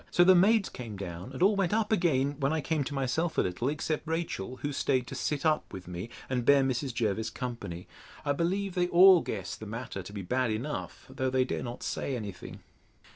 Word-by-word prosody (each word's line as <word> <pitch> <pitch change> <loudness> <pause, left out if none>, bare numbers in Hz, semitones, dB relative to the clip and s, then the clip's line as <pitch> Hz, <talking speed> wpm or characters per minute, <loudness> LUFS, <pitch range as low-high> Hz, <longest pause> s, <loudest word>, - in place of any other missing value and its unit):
So 175 - +5
the 185 +1 +7
maids 200 +3 +4
came 115 -5 -7
down, 90 +3 -6
and 135 +6 -1
all 205 +2 +5
went 195 0 +1
up 220 -1 0
again, 145 -8 +2
when 140 0 +1
I 160 - +1
came 155 0 0
to 145 - -5
myself 135 +6 -1
a - - +5
little, 95 +8 -1
except 155 +1 -2
Rachel, 160 - -3
who 145 0 -1
staid 130 -2 +1
to - - -8
sit 150 +1 -2
up 155 -1 +1
with 95 -2 -8
me, 90 +5 -6 0.2
and 125 -2 -1
bear 140 +2 +5
Mrs. 130 0 -1
Jervis 110 -2 -1
company. 115 -9 -6 0.4
I 145 - +2
believe 185 +6 0
they 175 -1 +1
all 180 0 +8
guess 95 -4 -4
the 110 - -9
matter 115 -2 -5
to 90 - -10
be 100 -2 -6
bad 125 +6 0
enough; 120 +8 -4
though 130 0 -2
they 130 0 +2
dare - - -3
not 120 0 -6
say 135 - -2
any 105 -4 -4
thing. 90 - -11
130 Hz, 225 wpm, -29 LUFS, 115-165 Hz, 0.4 s, all